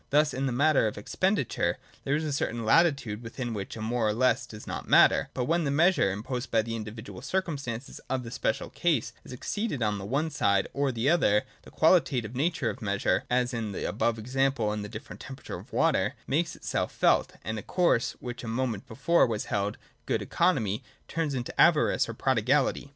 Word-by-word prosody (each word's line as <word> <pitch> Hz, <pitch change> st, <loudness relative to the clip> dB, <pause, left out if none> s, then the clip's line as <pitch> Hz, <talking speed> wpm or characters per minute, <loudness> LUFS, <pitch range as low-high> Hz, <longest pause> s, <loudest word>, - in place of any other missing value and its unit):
Thus 150 Hz, +1 st, +3 dB
in 135 Hz, +1 st, -1 dB
the -, -, -1 dB
matter 140 Hz, -1 st, +3 dB
of 105 Hz, -, -4 dB
expenditure, 185 Hz, -, 0 dB, 0.3 s
there 140 Hz, -, +1 dB
is 155 Hz, -, -1 dB
a 150 Hz, -2 st, -2 dB
certain 120 Hz, -4 st, -2 dB
latitude 140 Hz, -7 st, +3 dB
within 120 Hz, +1 st, -5 dB
which 100 Hz, -3 st, -5 dB
a 110 Hz, -, -5 dB
more 115 Hz, 0 st, 0 dB
or 105 Hz, -, +1 dB
less 120 Hz, +1 st, +2 dB
does 105 Hz, -2 st, -10 dB
not -, -, -5 dB
matter; -, -, +5 dB
but 125 Hz, -, 0 dB
when 170 Hz, +3 st, +1 dB
the 145 Hz, -, 0 dB
Measure, 165 Hz, -, +3 dB
imposed 120 Hz, +6 st, -4 dB
by 115 Hz, -1 st, +2 dB
the 115 Hz, +1 st, -4 dB
individual 110 Hz, +1 st, -7 dB
circumstances 140 Hz, -7 st, -3 dB
of 130 Hz, -1 st, -1 dB
the 115 Hz, -, -8 dB
special 125 Hz, -, -2 dB
case, 135 Hz, -10 st, 0 dB
is -, -, -12 dB
exceeded 145 Hz, -, -3 dB
on 105 Hz, -2 st, 0 dB
the 95 Hz, -, -6 dB
one 145 Hz, +9 st, -1 dB
side 100 Hz, -9 st, +2 dB
or 140 Hz, -1 st, +1 dB
the 120 Hz, +1 st, -1 dB
other, 105 Hz, -10 st, +4 dB, 0.2 s
the -, -, -14 dB
qualitative 130 Hz, -, +2 dB
nature 160 Hz, +6 st, 0 dB
of 125 Hz, -, -11 dB
Measure 100 Hz, -2 st, 0 dB
(as 125 Hz, 0 st, +1 dB
in 110 Hz, -3 st, -3 dB
the -, -, -3 dB
above 115 Hz, +2 st, 0 dB
examples 125 Hz, -1 st, 0 dB
of 105 Hz, -, -3 dB
the 105 Hz, -, -6 dB
different 110 Hz, 0 st, -9 dB
temperature 135 Hz, 0 st, -8 dB
of -, -, -15 dB
water) -, -, +2 dB
makes 165 Hz, +5 st, 0 dB
itself -, -, -2 dB
felt, -, -, +2 dB
and 110 Hz, +4 st, -3 dB
a -, -, -6 dB
course, 170 Hz, -, +1 dB
which 125 Hz, 0 st, -7 dB
a -, -, -6 dB
moment 115 Hz, -1 st, -2 dB
before 135 Hz, +7 st, +3 dB
was 110 Hz, -2 st, -2 dB
held 100 Hz, 0 st, -1 dB, 0.3 s
good -, -, 0 dB
economy, 115 Hz, -, +1 dB, 0.2 s
turns 160 Hz, -4 st, -2 dB
into 120 Hz, -1 st, -4 dB
avarice 155 Hz, -7 st, +4 dB
or 115 Hz, -, -5 dB
prodigality. 135 Hz, +4 st, +1 dB
125 Hz, 200 wpm, -28 LUFS, 110-145 Hz, 0.3 s, matter